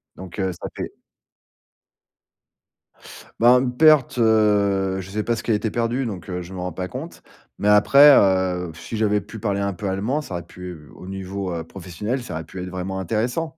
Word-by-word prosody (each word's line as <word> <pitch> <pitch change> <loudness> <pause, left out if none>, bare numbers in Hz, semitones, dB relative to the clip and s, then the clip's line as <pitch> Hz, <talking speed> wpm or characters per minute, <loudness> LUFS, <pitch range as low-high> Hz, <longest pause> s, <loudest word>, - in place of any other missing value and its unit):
Donc 95 +2 -10
heu, 95 -1 0
ça 85 - -7
fait - - -5 2.5
Ben, 125 +2 +6
une 125 -1 -2
perte, 155 -4 +5
heu, 100 -4 +2
je 95 - -11
sais 105 +2 -2
pas 115 - 0
ce - - -6
qui - - -1
a - - +4
été 105 +1 0
perdu, 120 +4 -1
donc 100 -5 -6
heu, 90 0 -3
je 90 +2 -10
m'en 90 -1 -5
rends 90 - -3
pas 90 +2 -4
compte 135 - -8 0.4
mais 105 - -1
après, 140 +8 +7
heu, 95 -2 +2
si 85 +7 -8
j'avais 105 -1 +2
pu 110 +3 -10
parler 100 -1 -1
un 100 - 0
peu 100 +3 -5
allemand, 110 +10 -1
ça 120 - -9
aurait 85 - -5
pu 90 -4 -10
au 90 - -11
niveau, 95 -1 -5
heu, 80 - -4
professionnel, 100 +9 -5
ça - - -7
aurait 80 +1 -4
pu 90 - -8
être 90 - -5
vraiment 95 +1 -4
intéressant, 120 - -2
100 Hz, 205 wpm, -22 LUFS, 90-115 Hz, 2.5 s, après